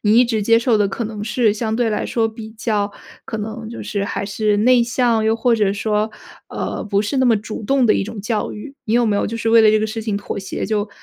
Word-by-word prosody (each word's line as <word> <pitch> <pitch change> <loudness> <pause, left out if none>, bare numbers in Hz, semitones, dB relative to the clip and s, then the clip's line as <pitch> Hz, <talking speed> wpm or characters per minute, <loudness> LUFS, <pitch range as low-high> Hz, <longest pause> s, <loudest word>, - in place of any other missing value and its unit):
你 215 +2 +4
一 250 - +6
直 225 -3 -1
接 230 +2 +4
受 235 -2 +2
的 205 -1 +2
可 230 +4 -4
能 210 -1 -5
是 220 0 +2
相 220 0 -2
对 235 -2 +1
来 210 - -1
说 225 -2 0
比 220 0 -9
较 215 -2 -1 0.4
可 220 - -4
能 220 +1 -6
就 235 - -7
是 200 -1 -2
还 200 - -3
是 210 +1 0
内 245 +3 +5
向？ 235 -1 +1
又 220 - +3
或 235 +1 +2
者 210 -3 +2
说， 210 +1 -1 0.4
呃， - - -4
不 200 -1 +1
是 215 +6 -2
那 260 - +3
么 230 -2 +4
主 215 +1 -6
动 270 +3 +2
的 215 - +5
一 - - 0
种 220 0 -7
教 215 +1 -2
育。 270 +7 -8
你 220 - 0
有 240 0 +4
没 210 -2 +1
有 - - 0
就 230 - -4
是 225 0 -1
为 230 0 +7
了 220 - +6
这 215 - +3
个 215 - 0
事 220 +1 -4
情 215 -2 -2
妥 200 0 -5
协， 195 - -4
就 210 -1 -1
220 Hz, 295 characters per minute, -20 LUFS, 210-230 Hz, 0.4 s, 为